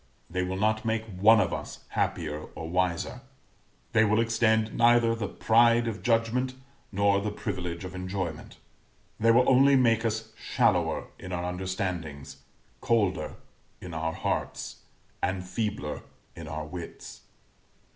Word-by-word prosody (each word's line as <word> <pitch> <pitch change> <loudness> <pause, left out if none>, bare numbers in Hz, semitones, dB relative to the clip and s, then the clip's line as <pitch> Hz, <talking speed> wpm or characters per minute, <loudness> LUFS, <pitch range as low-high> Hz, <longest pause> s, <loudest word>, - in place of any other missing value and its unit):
They 90 +1 -1
will 90 +1 -2
not 110 +2 +1
make 110 -1 -1
one 105 +2 +5
of - - +1
us - - -6
happier 75 -2 -2
or 80 - -6
wiser 90 +7 -1 0.7
they 110 -1 +5
will 110 +1 +3
extend 110 -1 +2
neither 120 -1 +4
the 115 -3 -3
pride 115 +2 +4
of 110 -2 -4
judgment 120 +2 +1 0.4
nor 100 0 +3
the 105 - -1
privilege 90 -4 -4
of 95 - -7
enjoyment. 90 -3 -5 0.6
They 115 - +3
will 120 +2 +5
only 135 +2 +6
make 115 -3 +3
us 110 -1 -2
shallower - - +1
in 90 - -8
our 90 -1 -2
understandings, 90 -6 -4 0.4
colder 100 -6 +1 0.4
in 90 -2 -8
our 80 +1 -2
hearts, - - -3 0.4
and 90 -1 -1
feebler 105 -7 -3 0.3
in 85 -2 -8
our 75 0 -4
wits. 85 +2 -9
100 Hz, 135 wpm, -28 LUFS, 90-115 Hz, 0.7 s, only